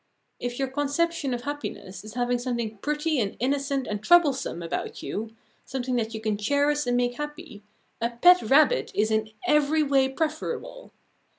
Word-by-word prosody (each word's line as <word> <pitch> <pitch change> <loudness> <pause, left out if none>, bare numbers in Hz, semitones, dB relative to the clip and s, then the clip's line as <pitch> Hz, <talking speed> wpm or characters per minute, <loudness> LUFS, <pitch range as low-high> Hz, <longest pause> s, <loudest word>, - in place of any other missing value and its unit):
If 245 0 -4
your 270 - 0
conception 290 +2 -1
of 245 -1 -2
happiness 285 -9 -6
is 215 +1 -10
having 245 0 0
something 235 -4 -3
pretty 300 +3 0
and 205 -4 -2
innocent 275 +1 0
and 210 -3 -4
troublesome 275 - +3
about 165 - -4
you, 225 +2 -5 0.3
something 255 -1 -3
that 225 -1 -2
you - - -4
can 215 -1 -1
cherish 285 +5 +1
and 245 0 +2
make 245 0 0
happy, 295 -6 -7 0.4
a 235 - +1
pet 355 +10 +6
rabbit 305 - +3
is 215 +1 +2
in 220 0 +1 0.2
every 300 +1 +3
way 270 -2 +3
preferable. 330 - -4
265 Hz, 165 wpm, -26 LUFS, 230-295 Hz, 0.4 s, pet